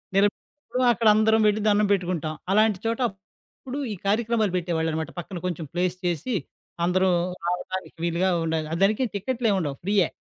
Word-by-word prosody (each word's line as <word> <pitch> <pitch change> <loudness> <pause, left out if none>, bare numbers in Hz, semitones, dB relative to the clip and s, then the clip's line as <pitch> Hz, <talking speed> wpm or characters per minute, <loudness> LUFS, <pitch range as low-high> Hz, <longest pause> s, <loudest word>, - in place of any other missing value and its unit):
నిలబెట్టినప్పుడు 205 +7 -1
అక్కడ 230 0 +1
అందరం 220 +1 +4
వెళ్లి 210 0 +2
దండం 210 0 +4
పెట్టుకుంటాం. 175 -5 0 0.2
అలాంటి 215 -2 +3
చోట, 230 +2 0
అప్పుడు, 210 +6 -12 0.2
ఈ - - -5
కార్యక్రమాలు 220 -1 +1
పెట్టేవాళ్ళన్నమాట, 160 -2 -1
పక్కన 175 +2 -6
కొంచెం 175 -3 -3
ప్లేస్ 180 +1 0
చేసి, 175 - -1 0.5
అందరూ 185 +2 +2 0.4
రావడానికి 180 +1 -3
వీలుగా 170 +2 +1 0.2
ఉండాలి. 160 -1 -1
ఆ! - - 0
దానికి 215 +6 +3
టికెట్లేముండవు 200 - 0
ఫ్రీయే. 195 -2 +3
195 Hz, 140 wpm, -25 LUFS, 175-215 Hz, 0.5 s, అందరం